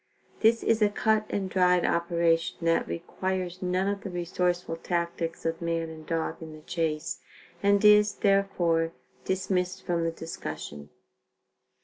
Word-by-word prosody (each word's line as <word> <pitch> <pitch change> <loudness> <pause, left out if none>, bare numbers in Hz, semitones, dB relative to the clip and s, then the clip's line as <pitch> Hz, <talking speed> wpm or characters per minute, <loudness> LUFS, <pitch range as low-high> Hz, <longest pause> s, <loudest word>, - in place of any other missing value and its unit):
This 225 +1 +4
is 225 -1 +2
a 210 - +5
cut 215 +1 +1
and 195 -2 -1
dried 180 -1 +3
operation 170 -1 +1
that 165 0 +2
requires 185 +1 -3
none 185 +1 0
of 200 0 -1
the 200 - -6
resourceful 175 -1 -1
tactics 170 -1 -3
of 165 0 -1
man 165 -1 -1
and 155 -1 -11
dog 165 -1 -2
in 160 -1 -8
the 155 - -12
chase, 155 -3 -2 0.4
and 200 +1 +3
is, 210 0 +7
therefore, 175 -5 +2 0.3
dismissed 185 0 -1
from 170 -1 0
the 165 - 0
discussion. 75 - -7
175 Hz, 140 wpm, -28 LUFS, 165-195 Hz, 0.4 s, is